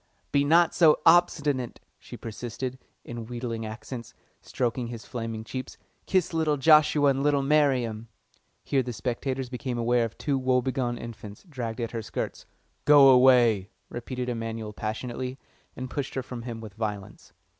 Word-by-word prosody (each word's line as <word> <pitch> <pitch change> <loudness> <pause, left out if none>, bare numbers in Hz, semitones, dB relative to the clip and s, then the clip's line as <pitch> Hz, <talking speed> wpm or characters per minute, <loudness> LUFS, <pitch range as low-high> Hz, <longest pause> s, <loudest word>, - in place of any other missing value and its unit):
"Be 140 0 +3
not 165 +3 +4
so 160 -3 +5
obstinate," 150 -7 +3 0.2
she - - -10
persisted, 120 +3 -6 0.3
in 120 -1 -7
wheedling 120 -2 -4
accents, 115 +2 -8 0.3
stroking 120 0 -2
his 115 -2 -8
flaming 115 -2 -5
cheeks. 130 +3 -6 0.3
"Kiss 185 -3 +1
little 155 -2 +1
Joshua 150 -1 +5
and 135 0 -1
little 145 -1 +2
Miriam." 130 -6 +1 0.6
Here 135 - +1
the 125 -1 -5
spectators 130 +3 -3
became 125 0 -4
aware 120 +1 +2
of 115 -1 -5
two 140 -3 -1
woebegone 130 -1 0
infants 110 -3 -9
dragging 120 -6 -4
at 115 - -4
her 115 - -3
skirts. - - -5 0.4
"Go 145 -2 +8
away!" 125 -6 +5 0.2
repeated 125 +1 -5
Emanuel 115 -2 -4
passionately, 120 +4 -4 0.4
and 130 - -5
pushed 135 +1 -4
her 130 - -2
from 125 -2 -7
him 115 -1 -6
with 110 -3 -9
violence. 105 -2 -6
125 Hz, 150 wpm, -27 LUFS, 115-135 Hz, 0.6 s, Go